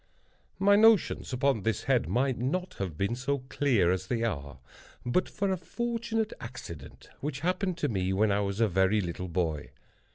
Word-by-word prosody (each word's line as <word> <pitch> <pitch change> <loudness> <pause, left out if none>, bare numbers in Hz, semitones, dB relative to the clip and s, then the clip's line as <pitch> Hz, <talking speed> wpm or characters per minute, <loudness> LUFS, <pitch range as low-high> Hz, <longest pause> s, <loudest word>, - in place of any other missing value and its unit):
My 200 +1 +5
notions 220 -8 +4
upon 130 -3 +1
this 110 +3 -1
head 130 -3 +2
might 130 0 +1
not 180 +9 -1
have 90 -6 -3
been 100 +6 0
so 130 +2 -2
clear 120 -14 +2
as 95 0 -2
they 115 +1 -1
are, 70 - -3 0.5
but 120 +10 +1
for 200 -2 -1
a 190 - 0
fortunate 225 +4 -2
accident 85 - -9
which 145 -1 -4
happened 180 +1 0
to 155 - 0
me 95 -5 -1
when 105 +2 +2
I 100 - +2
was 100 0 -2
a 115 - +4
very 95 +2 +2
little 90 -1 -3
boy. 80 -4 -2
120 Hz, 175 wpm, -29 LUFS, -, 0.5 s, My